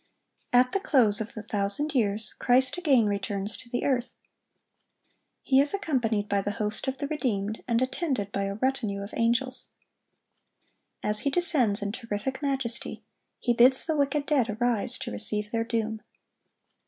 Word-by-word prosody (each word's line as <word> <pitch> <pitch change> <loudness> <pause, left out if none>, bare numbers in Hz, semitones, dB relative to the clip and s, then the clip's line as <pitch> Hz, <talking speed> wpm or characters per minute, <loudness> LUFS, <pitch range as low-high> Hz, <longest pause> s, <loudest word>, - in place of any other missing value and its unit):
] - - -45
At 250 +1 +4
the 390 - 0
close 235 - +3
of 220 - -6
the 215 - -6
thousand 210 +8 +1
years, 215 -4 0
Christ 255 +1 +2
again 285 -10 +3
returns 200 0 -2
to 235 - -10
the 245 - -2
earth. 255 -3 -1 1.3
He 265 0 +4
is 285 +6 +1
accompanied 240 - -1
by 200 -1 0
the 205 +1 -3
host 210 +4 -2
of 265 0 -2
the 285 - -3
redeemed, 220 -8 -2
and 235 +1 +2
attended 260 - -2
by 200 -1 -2
a 195 0 -3
retinue 220 -5 -1
of 200 - -10
angels. 250 +3 -1 1.3
As 210 0 +1
He 280 - 0
descends 270 - +2
in 200 - -2
terrific 230 +3 -4
majesty, 265 -3 -1 0.3
He 240 - 0
bids 250 +3 +5
the 320 - 0
wicked 285 0 0
dead 270 -7 +1
arise 240 -4 0
to - - -6
receive 210 - +2
their 230 -1 0
doom. 225 -2 -3
235 Hz, 165 wpm, -27 LUFS, 210-265 Hz, 1.3 s, bids